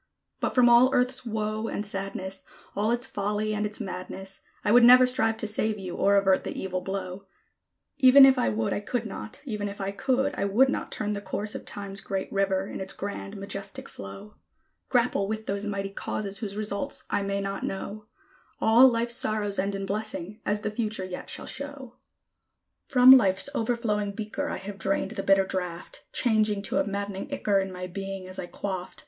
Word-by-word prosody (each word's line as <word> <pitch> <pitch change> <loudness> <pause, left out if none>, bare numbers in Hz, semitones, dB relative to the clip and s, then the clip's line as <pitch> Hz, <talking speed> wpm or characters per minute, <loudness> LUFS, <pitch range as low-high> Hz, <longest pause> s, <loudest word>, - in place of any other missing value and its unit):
But - - -2
from 250 -1 +6
all 240 +2 +6
Earth's 250 0 +1
woe 215 0 -2
and 210 - -3
sadness, 195 -1 -4 0.3
All 210 +2 +1
its 240 +2 +2
folly 210 -1 -2
and 210 0 0
its 210 +3 -6
madness, 190 -1 -6 0.3
I 205 - +3
would 240 +1 +7
never 250 +1 +9
strive 225 -3 +1
to 220 - -3
save 215 0 0
you, 185 -3 -6
or 200 +1 +3
avert 195 -1 +3
the - - -5
evil 185 -1 -3
blow; 190 0 -5 0.7
Even 270 +1 +9
if 265 -1 +6
I 250 - +1
would, 110 0 -1
I - - -1
could 230 +3 -3
not, 215 +3 -8
Even 210 -5 -3
if 200 - -9
I 195 0 -2
could, 265 +7 0
I - - -2
would 220 +7 +4
not - - -3
Turn 210 0 -2
the 200 - -4
course 210 +1 -4
of - - -7
Time's 200 0 -5
great 195 -1 -4
river, 195 -1 +1
in - - -7
its 190 0 -4
grand, 200 0 -6
majestic 195 0 -6
flow; 195 - -10 0.5
Grapple 240 -5 +2
with 220 +1 -4
those 200 +1 -3
mighty 195 -1 -3
causes 200 0 -4
whose 205 -3 -5
results 215 +6 -3
I - - +1
may 200 0 -1
not 195 0 -3
know: 210 +2 -5 0.5
All 235 +4 +7
Life's 235 -1 +1
sorrows 210 -2 +1
end 195 +1 0
in 195 0 -3
blessing, 210 0 -4
as 210 0 0
the 215 - -2
future 215 -3 -2
yet 180 -1 -7
shall - - -4
show. 280 -3 -7 0.9
From 255 -1 +8
Life's 200 -3 +5
overflowing 220 -4 -1
beaker 220 +8 -4
I - - -3
have 200 0 -8
drained 195 0 -1
the - - -3
bitter 195 0 +4
draught, 180 -2 -5
Changing 215 -4 +2
to - - 0
a - - +1
maddening 200 +5 -4
ichor 210 -8 +1
in 190 0 -3
my 180 0 -6
being 195 +1 -6
as 185 - -7
I 175 - -5
quaffed. 185 -1 -5
205 Hz, 195 wpm, -27 LUFS, 195-225 Hz, 0.9 s, never